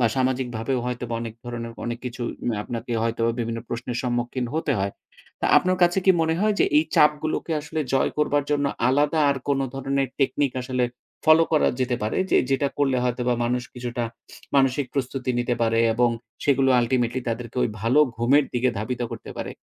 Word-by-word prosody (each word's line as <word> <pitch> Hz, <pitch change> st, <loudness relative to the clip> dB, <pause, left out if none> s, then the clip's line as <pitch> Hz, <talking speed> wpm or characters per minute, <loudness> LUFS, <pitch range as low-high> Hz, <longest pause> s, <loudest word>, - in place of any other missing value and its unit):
বা 120 Hz, -, +4 dB
সামাজিকভাবেও 130 Hz, -1 st, 0 dB
হয়তোবা 125 Hz, -1 st, -3 dB
অনেক 115 Hz, -2 st, -6 dB
ধরনের 120 Hz, -1 st, -5 dB
অনেক 120 Hz, 0 st, -3 dB
কিছু 125 Hz, 0 st, -5 dB, 0.3 s
ম্যা 110 Hz, -, -1 dB
আপনাকে 120 Hz, +1 st, -5 dB
হয়তোবা 115 Hz, 0 st, +1 dB
বিভিন্ন 115 Hz, 0 st, -3 dB
প্রশ্নের 120 Hz, 0 st, -4 dB
সম্মুখীন 125 Hz, 0 st, -1 dB
হতে 160 Hz, -2 st, 0 dB
হয়। 100 Hz, +1 st, -1 dB, 0.5 s
তো, -, -, -3 dB
আপনার 185 Hz, 0 st, 0 dB
কাছে 175 Hz, +2 st, +4 dB
কি -, -, +8 dB
মনে 160 Hz, 0 st, +1 dB
হয় 215 Hz, 0 st, +2 dB
যে, -, -, +6 dB
এই 155 Hz, -, +3 dB
চাপগুলোকে 150 Hz, +2 st, +2 dB
আসলে 155 Hz, +1 st, -4 dB
জয় 135 Hz, -, +2 dB
করবার 145 Hz, -1 st, +2 dB
জন্য 145 Hz, -1 st, +2 dB, 0.2 s
আলাদা 150 Hz, +4 st, +2 dB
আর 140 Hz, -, 0 dB
কোনো 135 Hz, -1 st, +2 dB
ধরনের 135 Hz, 0 st, -1 dB
টেকনিক 135 Hz, 0 st, +1 dB
আসলে 125 Hz, -1 st, 0 dB, 0.4 s
ফলো 155 Hz, +1 st, +7 dB
করা 155 Hz, -, +4 dB
যেতে 125 Hz, -1 st, +1 dB
পারে? 110 Hz, -, -1 dB
যে, -, -, +5 dB
যেটা 135 Hz, +1 st, +2 dB
করলে 135 Hz, -2 st, +2 dB
হয়তোবা 125 Hz, 0 st, 0 dB
মানুষ 125 Hz, +1 st, 0 dB
কিছুটা 120 Hz, -1 st, -3 dB, 0.5 s
মানসিক 135 Hz, 0 st, +3 dB
প্রস্তুতি 130 Hz, -1 st, -2 dB
নিতে 120 Hz, 0 st, 0 dB
পারে 115 Hz, 0 st, +2 dB, 0.2 s
এবং 120 Hz, +1 st, +3 dB, 0.3 s
সেগুলো 135 Hz, -1 st, +3 dB
ultimately 120 Hz, +1 st, 0 dB
তাদেরকে 115 Hz, +1 st, -4 dB
ঐ -, -, +4 dB, 0.2 s
ভালো 125 Hz, +6 st, +4 dB, 0.2 s
ঘুমের 130 Hz, +5 st, +4 dB
দিকে 125 Hz, +1 st, +2 dB
ধাবিত 115 Hz, +4 st, -3 dB
করতে -, -, -8 dB
পারে? -, -, -4 dB
125 Hz, 180 wpm, -24 LUFS, 120-140 Hz, 0.5 s, কি